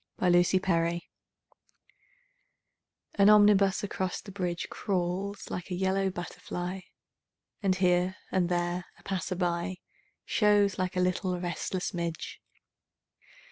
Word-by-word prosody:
SYMPHONY 175 -1 +5
IN 185 - +2
YELLOW 170 -1 +2 2.1
AN 200 0 +5
omnibus 205 -2 +5
across 190 -2 -2
the 200 - -10
bridge 180 -3 -2
Crawls 195 +1 -2
like 180 - -5
a 180 - -2
yellow 190 +1 +1
butterfly 175 +1 -5 0.8
And, 190 -2 +2
here 180 0 +2 0.2
and 180 -2 +1
there, 175 0 -1
a - - -21
passer 185 -1 -2
by 175 0 -1 0.5
Shows 205 -3 +3
like 185 0 -1
a - - +3
little 180 0 0
restless 180 +1 -3
midge. 170 -2 -4
185 Hz, 115 wpm, -29 LUFS, 175-195 Hz, 2.1 s, SYMPHONY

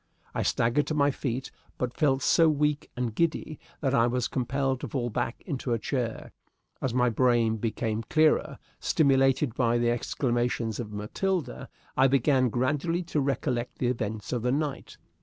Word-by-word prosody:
I - - -1
staggered 120 +6 +1
to 155 - -1
my 145 -1 +3
feet, 130 -1 -4 0.3
but 125 -1 -2
felt 135 -2 +1
so 165 -2 +5
weak 150 0 0
and 120 -3 -1
giddy 155 +1 -1 0.2
that 135 -2 0
I 115 -3 +4
was 125 0 0
compelled 135 +1 -1
to - - -5
fall 120 -4 -2
back 115 - -3
into 135 -7 -2
a - - +2
chair. 115 0 -3 0.5
As 130 - 0
my 125 0 +2
brain 115 -1 +2
became 110 0 -2
clearer, 155 0 +3 0.2
stimulated 135 -2 +3
by 120 -1 +2
the 120 0 +2
exclamations 120 -2 -1
of 110 -3 -5
Matilda, 160 - -3 0.3
I 135 - +5
began 135 -1 +3
gradually 145 +9 0
to 160 -3 -1
recollect 125 -3 -1
the 125 - 0
events 110 -3 -3
of 120 - -1
the 125 +2 +1
night. 145 0 -3
130 Hz, 165 wpm, -27 LUFS, 120-140 Hz, 0.5 s, so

